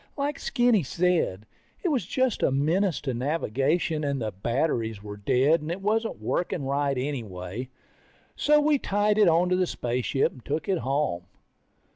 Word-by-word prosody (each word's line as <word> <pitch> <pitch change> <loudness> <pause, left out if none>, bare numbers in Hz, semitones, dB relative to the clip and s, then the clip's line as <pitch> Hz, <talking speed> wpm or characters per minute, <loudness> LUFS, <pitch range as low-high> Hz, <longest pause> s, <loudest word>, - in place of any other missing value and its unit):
Like 285 +1 -2
Skinny 240 -5 +2
said, 165 - 0 0.4
it 360 - +1
was 255 - 0
just 255 +1 0
a - - +3
menace 160 +7 +1
to 135 -3 -2
navigation, 150 +4 0
and 140 -1 -1
the 110 -2 -2
batteries 115 - -1
were 105 -1 -7
dead, 130 +10 +2
and 155 +2 -4
it 175 - -3
wasn't 220 +3 -1
working 175 -4 -2
right 140 0 0
anyway. 120 -4 -4 0.7
So 300 0 +4
we 295 -1 +3
tied 205 0 +1
it 210 - +6
onto 175 +2 +3
the 185 -1 +1
spaceship 125 +1 0
and 125 - -15
took 150 +1 -3
it 190 -3 +1
home. 135 -11 -1
150 Hz, 160 wpm, -26 LUFS, 125-190 Hz, 0.7 s, it